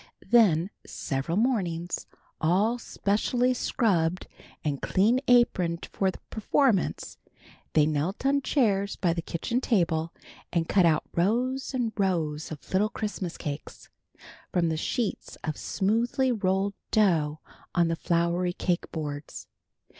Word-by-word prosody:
Then 195 -6 +5
several 135 +6 -3
mornings, 180 -8 -1 0.3
all 200 +9 +2
specially 240 +5 0
scrubbed 185 -9 +1 0.4
and 145 -3 -2
clean 220 +7 +3
aproned 185 -9 +3
for 195 - +1
the - - -6
performance, 220 -1 +1 0.5
they 150 - +5
knelt 155 - -1
on 280 +1 +3
chairs 200 -9 +1
by 175 -3 +1
the 170 - -2
kitchen 235 +10 -2
table, 165 -9 +1 0.4
and 165 -1 0
cut 185 -4 +4
out 155 -2 +2
rows 250 +9 0
and 235 -3 -1
rows 160 -6 0
of 155 +3 -9
little 205 +3 +3
Christmas 205 -6 -4
cakes, 145 0 -7 0.6
from 170 -2 +2
the 160 - 0
sheets 220 +7 -2
of 155 -2 -2
smoothly 235 +6 0
rolled 195 -2 0 0.2
dough 160 -8 +2 0.4
on 170 -2 +4
the 165 - 0
floury 170 +2 0
cake 175 -1 -1
boards. 145 -2 -5
185 Hz, 125 wpm, -27 LUFS, 165-225 Hz, 0.6 s, Then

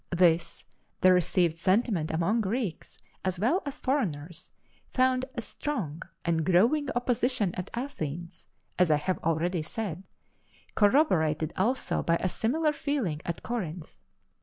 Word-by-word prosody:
This, 175 -2 +2 0.4
the 185 0 +7
received 175 -1 +2
sentiment 190 -3 +1
among 175 +8 +1
Greeks, 210 -4 -3 0.2
as 185 -1 -1
well 255 - +2
as 280 +1 -5
foreigners, 180 - -2 0.4
found 255 0 +2
a 235 - -3
strong 205 - -4 0.2
and 165 -2 +1
growing 225 - +3
opposition 245 -5 +1
at 180 - -5
Athens, 170 - -5 0.3
as 180 -2 +4
I 155 - +5
have 180 +5 -1
already 165 +2 0
said 180 +1 -4 0.7
corroborated 170 - +3
also 240 +8 0
by 165 - +2
a 185 - 0
similar 300 - +1
feeling 270 - -2
at 170 - -4
Corinth. 180 -9 -5
185 Hz, 130 wpm, -28 LUFS, 165-245 Hz, 0.7 s, the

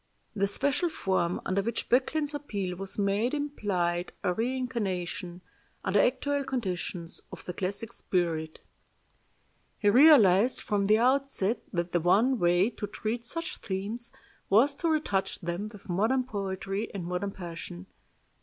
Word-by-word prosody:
The 200 0 +2
special 285 - 0
form 185 - 0
under 195 +1 +1
which 230 +3 -3
Böcklin's 290 +4 +2
appeal 200 -11 -3
was 195 +1 -4
made 205 +6 +1
implied 185 -12 -1
a 180 - +2
reincarnation, 205 -7 -2 0.4
under 195 +1 +2
actual 285 +3 +1
conditions, 185 -9 -3
of - - -10
the 180 - -4
classic 200 +5 -3
spirit. 160 -3 -1 1.2
He 205 -1 +3
realized 245 - +6
from 205 -2 0
the 215 +1 +5
outset 245 -3 +1
that 170 -2 -2
the 175 - +2
one 220 +9 +3
way 175 +5 +3
to 210 - -5
treat 225 +3 -3
such 330 +3 -2
themes 205 +5 -4 0.4
was 240 +9 +5
to 335 - 0
retouch 300 -12 0
them 175 +4 -3
with 205 -3 -14
modern 220 +9 +2
poetry 195 -2 -3
and 180 -3 -4
modern 180 +3 -2
passion. 165 - -7
200 Hz, 135 wpm, -29 LUFS, 180-250 Hz, 1.2 s, realized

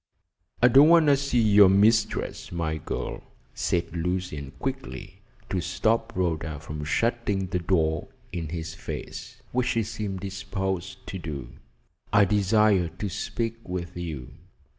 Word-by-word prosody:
"I - - +9
don't 140 +5 +7
want 170 -1 +7
to 145 -1 +6
see 140 -3 0
your 105 -2 +7
mistress, 105 +3 +2
my 80 -2 -2
girl," - - -4 0.3
said 85 -1 -1
Lucian 85 -5 -2
quickly, 130 - -5 0.3
to 95 - 0
stop 110 +6 0
Rhoda 80 -4 -1
from 75 0 -6
shutting 105 +3 0
the 90 0 -2
door 80 -3 +1 0.2
in 80 -3 -4
his 80 -1 -5
face, - - -7
which 125 0 +1
she 115 -2 +1
seemed 100 -3 -4
disposed 95 -1 -4
to 95 - -5
do. 75 -6 -6 0.6
"I 100 -1 +6
desire 105 -2 +3
to 100 +5 -5
speak 115 +4 -3
with 90 -1 -4
you." 80 -8 -5
95 Hz, 140 wpm, -26 LUFS, 85-110 Hz, 0.6 s, I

